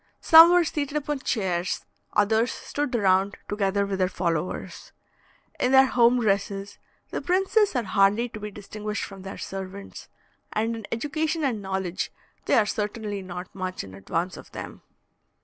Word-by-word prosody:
Some 325 Hz, +1 st, +9 dB
were 355 Hz, 0 st, +5 dB
seated 295 Hz, -2 st, -2 dB
upon 295 Hz, -1 st, -2 dB
chairs, 190 Hz, -8 st, -1 dB, 0.3 s
others 220 Hz, +3 st, +3 dB
stood 290 Hz, -4 st, -3 dB
round, 195 Hz, -2 st, +2 dB
together 200 Hz, -1 st, 0 dB
with 195 Hz, -1 st, -3 dB
their 185 Hz, -1 st, +2 dB
followers. 170 Hz, -2 st, -3 dB, 0.7 s
In 250 Hz, -, +2 dB
their 265 Hz, 0 st, +8 dB
home 245 Hz, -1 st, +4 dB
dresses, 200 Hz, -2 st, -1 dB, 0.3 s
the -, -, -3 dB
princes 385 Hz, +1 st, +2 dB
are 245 Hz, -, +1 dB
hardly 200 Hz, +4 st, +3 dB
to 215 Hz, -, -8 dB
be 210 Hz, 0 st, -5 dB
distinguished 210 Hz, +1 st, -5 dB
from 195 Hz, -1 st, -8 dB
their 190 Hz, +1 st, -7 dB
servants, 195 Hz, +1 st, -7 dB, 0.4 s
and 225 Hz, +2 st, 0 dB
in 225 Hz, -2 st, -8 dB
education 310 Hz, +6 st, -1 dB
and 240 Hz, -7 st, 0 dB
knowledge 190 Hz, -2 st, -3 dB, 0.3 s
they -, -, +3 dB
are 220 Hz, -, +4 dB
certainly 210 Hz, -1 st, -3 dB
not 180 Hz, 0 st, -8 dB
much 185 Hz, -1 st, -4 dB
in 95 Hz, -1 st, -11 dB
advance 165 Hz, -, -3 dB
of -, -, -13 dB
them. -, -, -8 dB
210 Hz, 155 wpm, -25 LUFS, 190-250 Hz, 0.7 s, Some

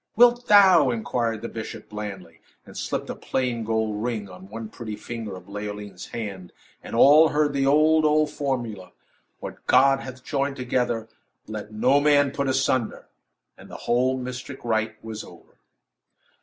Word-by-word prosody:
"Wilt 240 Hz, +1 st, +5 dB
thou?" 190 Hz, -8 st, +7 dB
inquired 115 Hz, -1 st, -2 dB
the -, -, -2 dB
bishop, 110 Hz, -1 st, -7 dB
blandly, 95 Hz, -6 st, -7 dB, 0.3 s
and -, -, -14 dB
slipped -, -, -3 dB
a -, -, -6 dB
plain 125 Hz, -3 st, -2 dB
gold 110 Hz, -1 st, -1 dB
ring 110 Hz, -3 st, -3 dB
on 95 Hz, +1 st, -13 dB
one 110 Hz, +1 st, -6 dB
pretty 110 Hz, -1 st, -7 dB
finger 115 Hz, -3 st, -6 dB
of 90 Hz, -, -12 dB
Leoline's 105 Hz, -2 st, -7 dB
hand 100 Hz, -6 st, -6 dB, 0.3 s
and -, -, -7 dB
all 150 Hz, +6 st, +7 dB
heard 150 Hz, -1 st, +1 dB
the 135 Hz, -1 st, +1 dB
old, 155 Hz, +2 st, +4 dB
old 155 Hz, 0 st, +3 dB
formula: 120 Hz, -9 st, -4 dB, 0.5 s
"What -, -, -8 dB
God 135 Hz, +1 st, +5 dB
hath 130 Hz, -1 st, -9 dB
joined 140 Hz, 0 st, -1 dB
together, 120 Hz, -3 st, -1 dB, 0.4 s
let 110 Hz, 0 st, -7 dB
no 125 Hz, +6 st, +3 dB
man 145 Hz, -1 st, +4 dB
put 140 Hz, 0 st, -2 dB
asunder!" 130 Hz, -3 st, 0 dB, 0.5 s
And -, -, -15 dB
the -, -, -8 dB
whole 130 Hz, +2 st, +2 dB
mystic 130 Hz, +1 st, -7 dB
rite 110 Hz, -1 st, 0 dB
was 110 Hz, -1 st, -6 dB
over. -, -, -16 dB
120 Hz, 155 wpm, -24 LUFS, 110-140 Hz, 0.5 s, thou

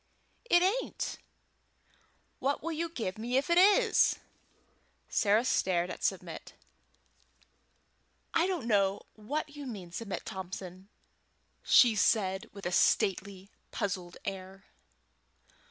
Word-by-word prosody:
"It 350 Hz, -7 st, +4 dB
ain't." 430 Hz, +7 st, -1 dB, 1.2 s
"What 280 Hz, +2 st, -1 dB
will 335 Hz, -, -2 dB
you 330 Hz, +1 st, -2 dB
give 215 Hz, -, -4 dB
me 240 Hz, +3 st, -1 dB
if 280 Hz, +6 st, 0 dB
it 340 Hz, -, +6 dB
is?" 415 Hz, +4 st, +5 dB, 0.9 s
Sarah 215 Hz, +2 st, +2 dB
stared 180 Hz, -6 st, +1 dB
at -, -, -8 dB
Submit. -, -, -3 dB, 1.8 s
"I 335 Hz, -, +3 dB
don't 360 Hz, -10 st, -2 dB
know 200 Hz, -3 st, +1 dB
what 290 Hz, +7 st, -5 dB
you 290 Hz, -2 st, -7 dB
mean, 195 Hz, -8 st, -8 dB
Submit 205 Hz, +1 st, -5 dB
Thompson," 185 Hz, 0 st, -7 dB, 0.7 s
said 210 Hz, -4 st, +4 dB
she, -, -, -13 dB
with 200 Hz, 0 st, -11 dB
a 175 Hz, -, -1 dB
stately 195 Hz, +1 st, +1 dB
and -, -, -41 dB
puzzled 185 Hz, -5 st, -4 dB
air. 190 Hz, 0 st, -6 dB
210 Hz, 115 wpm, -30 LUFS, 190-290 Hz, 1.8 s, it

